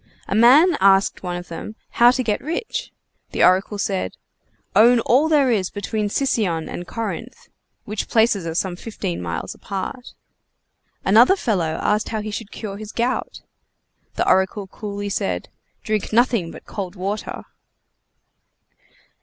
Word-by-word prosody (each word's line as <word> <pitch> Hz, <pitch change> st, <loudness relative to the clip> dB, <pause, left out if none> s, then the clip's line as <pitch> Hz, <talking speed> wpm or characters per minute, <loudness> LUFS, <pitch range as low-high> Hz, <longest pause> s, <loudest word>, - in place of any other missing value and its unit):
A -, -, -2 dB
man 280 Hz, -, +6 dB
asked 195 Hz, 0 st, +4 dB
one 180 Hz, -1 st, -4 dB
of 175 Hz, -, -8 dB
them 170 Hz, +6 st, -7 dB, 0.2 s
how 240 Hz, +1 st, +6 dB
to 255 Hz, +1 st, +1 dB
get 215 Hz, -3 st, -1 dB
rich? 450 Hz, -, -4 dB, 0.4 s
The -, -, +2 dB
oracle 190 Hz, +3 st, +3 dB
said: 195 Hz, -, -2 dB, 0.6 s
"Own 235 Hz, +4 st, +6 dB
all 275 Hz, +8 st, +3 dB
there 285 Hz, -5 st, +4 dB
is 195 Hz, -5 st, +1 dB
between 205 Hz, +1 st, -3 dB
Sicyon 200 Hz, -, 0 dB
and 175 Hz, -, -6 dB
Corinth." 230 Hz, +2 st, -6 dB, 0.4 s
Which 210 Hz, 0 st, -4 dB
places 220 Hz, -6 st, +2 dB
are 165 Hz, -, -4 dB
some 180 Hz, 0 st, -1 dB
fifteen 135 Hz, -, -5 dB
miles 85 Hz, +2 st, -4 dB
apart. 200 Hz, +6 st, -6 dB, 0.9 s
Another 230 Hz, -, +6 dB
fellow 180 Hz, -, -1 dB
asked 210 Hz, +1 st, +1 dB
how 220 Hz, -1 st, -2 dB
he 215 Hz, 0 st, -5 dB
should 210 Hz, 0 st, -6 dB
cure 200 Hz, -3 st, -6 dB
his 215 Hz, 0 st, -8 dB
gout? 250 Hz, -, -2 dB, 0.7 s
The -, -, 0 dB
oracle 190 Hz, +2 st, +2 dB
coolly 205 Hz, +1 st, -6 dB
said: 90 Hz, -, -2 dB, 0.3 s
"Drink 215 Hz, -2 st, -2 dB
nothing 230 Hz, -6 st, +2 dB
but -, -, -11 dB
cold 190 Hz, -2 st, -6 dB
water!" 200 Hz, +3 st, -4 dB
210 Hz, 145 wpm, -21 LUFS, 190-235 Hz, 0.9 s, man